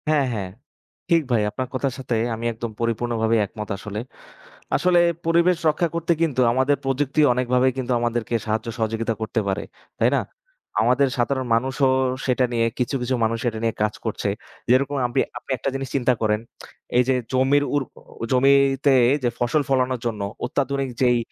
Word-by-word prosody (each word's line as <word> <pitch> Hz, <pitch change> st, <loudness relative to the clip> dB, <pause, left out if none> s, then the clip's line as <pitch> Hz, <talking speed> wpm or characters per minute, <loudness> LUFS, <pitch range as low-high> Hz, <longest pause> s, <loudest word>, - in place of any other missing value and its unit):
হ্যা, 155 Hz, -1 st, +4 dB
হ্যা। 105 Hz, -3 st, -2 dB, 0.7 s
ঠিক 170 Hz, -2 st, +4 dB
ভাই। 115 Hz, -3 st, +3 dB
আপনার 130 Hz, +3 st, -4 dB
কথার 130 Hz, 0 st, -1 dB
সাথে 125 Hz, -2 st, -2 dB, 0.2 s
আমি 115 Hz, +1 st, -6 dB
একদম 115 Hz, 0 st, -5 dB
পরিপূর্ণভাবেই 115 Hz, -1 st, 0 dB
একমত 105 Hz, +2 st, -8 dB
আসলে। 105 Hz, +2 st, -6 dB, 0.8 s
আসলে 180 Hz, -1 st, +3 dB, 0.3 s
পরিবেশ 170 Hz, +2 st, +4 dB
রক্ষা 160 Hz, +3 st, +1 dB
করতে 170 Hz, 0 st, +1 dB
কিন্তু 145 Hz, -6 st, +1 dB
আমাদের 130 Hz, +3 st, +2 dB
প্রযুক্তি 135 Hz, +2 st, 0 dB
অনেকভাবেই 125 Hz, +1 st, +2 dB
কিন্তু, 130 Hz, -1 st, -1 dB
আমাদেরকে 120 Hz, -1 st, -1 dB
সাহায্য, 110 Hz, +1 st, -1 dB
সহযোগিতা 115 Hz, 0 st, -1 dB
করতে 110 Hz, +1 st, -1 dB
পারে। 95 Hz, -, -1 dB, 0.4 s
তাই -, -, +3 dB
না? -, -, +2 dB, 0.6 s
আমাদের 125 Hz, +4 st, +3 dB
সাধারণ 130 Hz, +1 st, 0 dB
মানুষও 130 Hz, +3 st, +1 dB, 0.4 s
সেটা 130 Hz, -1 st, +2 dB
নিয়ে, 115 Hz, -1 st, +2 dB
কিছু, 125 Hz, +2 st, -1 dB
কিছু 125 Hz, +1 st, 0 dB
মানুষ 115 Hz, +1 st, 0 dB
এটা 110 Hz, -1 st, -3 dB
নিয়ে 115 Hz, -, 0 dB
কাজ 105 Hz, 0 st, 0 dB
করছে, 110 Hz, -2 st, -2 dB, 0.4 s
যেরকম 140 Hz, +3 st, +3 dB
আপনি। 120 Hz, -, 0 dB, 0.2 s
আপনি -, -, -16 dB
একটা -, -, -3 dB
জিনিস 135 Hz, -1 st, -3 dB
চিন্তা 130 Hz, -2 st, +3 dB
করেন, 105 Hz, -1 st, +2 dB, 0.6 s
এই 125 Hz, -, +6 dB
যে 130 Hz, -, +4 dB, 0.2 s
জমির 135 Hz, +3 st, +3 dB
উর 145 Hz, -, +2 dB, 0.5 s
জমিতে 135 Hz, +1 st, +4 dB, 0.3 s
যে 125 Hz, -, +2 dB
ফসল 120 Hz, +5 st, +1 dB
ফলানোর 130 Hz, -2 st, +1 dB
জন্য 110 Hz, -3 st, -2 dB, 0.2 s
অত্যাধুনিক 140 Hz, 0 st, -1 dB
যেই 125 Hz, -2 st, +4 dB
125 Hz, 165 wpm, -23 LUFS, 115-140 Hz, 0.8 s, এই